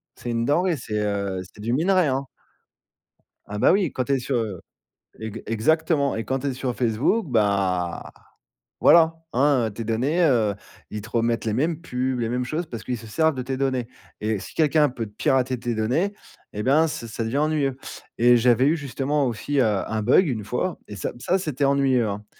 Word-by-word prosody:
C'est 120 - -5
une 115 0 0
denrée, 170 +6 +2
c'est, 110 -6 -4
heu, 100 -2 -2
c'est 95 +3 -13
du 115 +3 -2
minerai, 175 +4 +3
hein. 135 +1 -1 1.2
Ah 105 0 -5
bah, - - +5
oui, 190 -5 +2
quand 130 - -2
tu 140 - 0
es 135 - +2
sur, 125 0 -1
heu, 105 -6 -3 0.6
eg 110 0 -6
exactement 145 +5 +1
et 110 - -3
quand 135 - -1
tu 140 - -3
es 135 - -1
sur 125 -1 -3
Facebook, 125 - +1
bah, 100 -6 0 0.7
voilà. 165 -1 +6 0.2
Hein, 130 -2 +3
heu, - - -7
tes 115 +3 -6
données, 130 +10 0
heu, 110 -8 +3 0.4
ils 105 - -5
te 110 - -10
remettent 115 0 0
les 110 - 0
mêmes 155 +7 0
pubs, 130 -4 -2
les 115 - -1
mêmes 125 +1 -1
choses 155 +6 -3
parce 115 -5 -7
qu'ils 125 -2 -3
se 115 - -11
servent 160 +6 +1
de 130 - -2
tes 130 +1 -3
données 130 -3 -1 0.3
et 105 -2 -1
si - - -9
quelqu'un 150 -1 +3
peut 120 -3 -5
te 105 - -15
pirater 130 +3 +1
tes 120 -2 -2
données 135 - 0 0.4
et 105 +1 -4
ben, 155 +5 +4
ça 120 - -5
ça 110 - -10
ça 115 - -2
devient 115 +5 -1
ennuyeux 150 -3 +1 0.4
et 120 +1 +6
j'avais 125 +2 +4
eu 160 +3 +3
justement, 140 0 -1
aussi, 135 +5 -1
heu, - - +5
un 110 +1 -1
bug, 180 - +4
1 115 -6 -2
fois 160 - -2
et 105 - -8
ça 95 - -3
ça, 185 +8 +1
c'était 150 -6 -2
ennuyeux, 135 -4 +2
hein. 105 +1 -5
125 Hz, 210 wpm, -24 LUFS, 110-145 Hz, 1.2 s, voilà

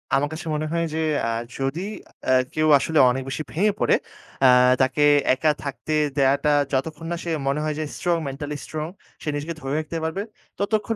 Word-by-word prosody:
আমার 145 +2 +1
কাছে 160 +1 -7
মনে 155 +1 -2
হয় 170 0 +1
যে - - -2 0.2
অ্যা 115 - 0 0.3
যদি 135 +6 -2 0.4
অ্যা 130 - +3 0.2
কেউ 155 0 +2
আসলে 160 +1 +1
অনেক 130 +1 -1
বেশি 135 +3 -3
ভেঙে 205 +6 +2
পড়ে, - - +4 0.5
অ্যা 130 - +7 0.3
তাকে 130 +3 +2 0.3
একা 150 +4 +2
থাকতে 140 +2 -4 0.2
দেওয়াটা 140 +2 +3 0.2
যতক্ষণ 155 +4 -2
না - - 0
সে 170 - -4 0.2
মনে 140 +2 +1
হয় 155 -1 -1
যে - - -1
strong, 175 -1 +1
mentally 145 +2 -5
strong 155 0 -4 0.3
সে - - -9
নিজেকে 150 +3 -3
ধরে 135 +1 -3
রাখতে 155 +1 -4
পারবে, 160 +5 -2 0.4
ততক্ষণ 215 +2 0
155 Hz, 185 wpm, -23 LUFS, 135-165 Hz, 0.5 s, অ্যা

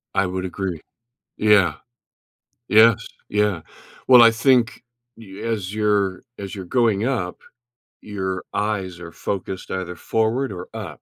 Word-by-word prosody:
I 100 - +3
would 95 0 -3
agree. 95 -3 -4 0.6
Yeah. 105 -3 +4 0.9
Yes, 110 0 +5 0.2
yeah. 105 -4 0 0.5
Well, 125 -2 +9
I 115 - +7
think 120 +1 +2 0.3
y 100 -4 -12
as 105 -4 -3
you're 105 -3 +1 0.2
as 100 0 -6
you're 95 -2 -7
going 115 0 +1
up, 110 -9 -2 0.6
your 95 -3 -4
eyes 95 -4 -2
are 85 -1 -9
focused 95 +2 -5
either 90 -1 -4
forward 115 +3 0
or 90 0 -8
up. 95 - -7
100 Hz, 130 wpm, -22 LUFS, 95-110 Hz, 0.9 s, Well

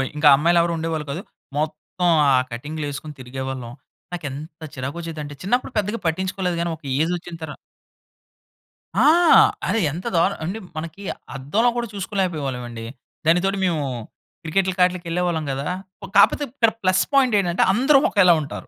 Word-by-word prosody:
ఇంకా 150 0 +3
అమ్మాయిలు 170 +4 +3
ఎవరు 170 0 0
ఉండేవాళ్ళు 160 -2 -2
కాదు. 170 +7 -4 0.4
మొత్తం 155 +3 -1 0.2
ఆ - - +5 0.2
కటింగ్‌లు 150 +6 -5
ఏసుకొని 150 +1 -8
తిరిగేవాళ్ళం. 130 -1 -5 0.4
నాకు 170 -4 -5
ఎంత 155 +4 -9
చిరాకొచ్చేదంటే 150 +2 -5
చిన్నప్పుడు 245 +6 0
పెద్దగా 210 +2 -1
పట్టించుకోలేదు 185 +1 -1
గాని 170 0 -1
ఒక 155 - -23 0.2
ఏజ్ 165 +3 +1
వచ్చిన 170 0 -9
తర 155 - -5 1.5
ఆ! 250 +8 +5 0.6
అరె 225 - +1
ఎంత 175 +7 -7
దారుణం 185 +4 +2
అంటే 200 +6 -3 0.2
మనకి 165 +5 -6 0.3
అద్దంలో 200 - +1
కూడా 235 -1 -1
చూసుకోలేకపోయేవాళ్ళం 175 - -2
అండి. 115 -1 -7 0.4
దానితోటి 185 +4 +3
మేము 160 -5 0 0.6
క్రికెట్‌లకి 185 +2 0
ఆటిలకి 180 -1 0
వెళ్ళేవాళ్ళం 170 -2 -1
గదా! 135 +2 -3 0.5
కాపోతే 200 +8 +5
ఇక్కడ 230 -5 +3
ప్లస్ 185 0 +3
పాయింట్ 260 -4 +4
ఏంటంటే 175 -2 +1
అందరూ 270 +5 +5
ఒకేలా 185 -4 +5
ఉంటారు. 145 - -7
170 Hz, 145 wpm, -22 LUFS, 150-190 Hz, 1.5 s, ఆ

